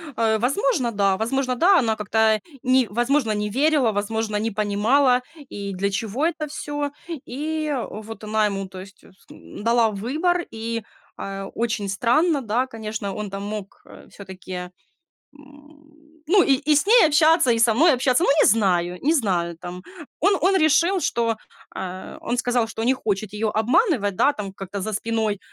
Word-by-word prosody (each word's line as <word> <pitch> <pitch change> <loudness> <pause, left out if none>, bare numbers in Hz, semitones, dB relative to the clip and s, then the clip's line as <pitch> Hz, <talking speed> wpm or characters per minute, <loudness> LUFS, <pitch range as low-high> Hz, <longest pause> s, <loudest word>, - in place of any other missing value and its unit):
А 220 -1 +2
возможно, 260 - 0
да, 200 -2 +1
возможно, 255 +3 -1
да, 360 +7 +5
она 225 -5 +1
как-то, 215 +1 +2 0.2
ни 255 -1 +3
возможно, 240 +2 +1
не 210 0 -2
верила, 275 0 +2
возможно, 210 +1 -2
не 220 +2 -1
понимала, 225 +6 +2 0.3
и 200 -1 -6
для 195 +2 -1
чего 225 +7 -2
это 315 -2 -2
всё. 290 -1 -4 0.4
И 305 +3 -3 0.2
вот 220 +1 -9
она 215 0 +1
ему, 195 -1 -4
то 185 0 -10
есть, 190 +2 -12
с 190 - -22
м, - - -11
дала 230 -1 +3
выбор, 310 - -1
и, 230 0 -4 0.3
а, 195 0 -6
очень 220 -3 -2
странно, 275 - +2
да, 245 +3 -1
конечно, 215 -3 -5
он 210 -1 -5
там 195 +1 -6
мог, 210 -1 -4 0.2
э, - - -15
всё-таки, 190 -1 -11 0.8
м, 300 +2 -20
ну, 390 +2 +5
и 275 - +3
и - - +4
с 295 - +2
ней 465 -1 +7
общаться, 310 -2 +4
и 230 - +1
со 230 0 +4
мной 310 +7 +5
общаться, 255 +4 +2
ну, - - +2
не - - +5
знаю, 180 -5 +2
не 310 +4 +2
знаю 180 - 0
там. 180 +1 -8 0.4
Он 390 +2 +3
он 385 +2 +3
решил, 340 +4 +3
что, 230 -7 0 0.4
а, 185 0 -7
он 245 - -2
сказал, 245 -1 +1
что 225 0 -5
не 250 +3 +3
хочет 210 -5 -3
её 210 0 -1
обманывать, 225 - +2
да, 285 +9 +3
там 200 -5 -6
как-то 195 0 -6
за 220 +3 -4
спиной. 220 -1 -1
230 Hz, 175 wpm, -23 LUFS, 205-290 Hz, 0.8 s, ней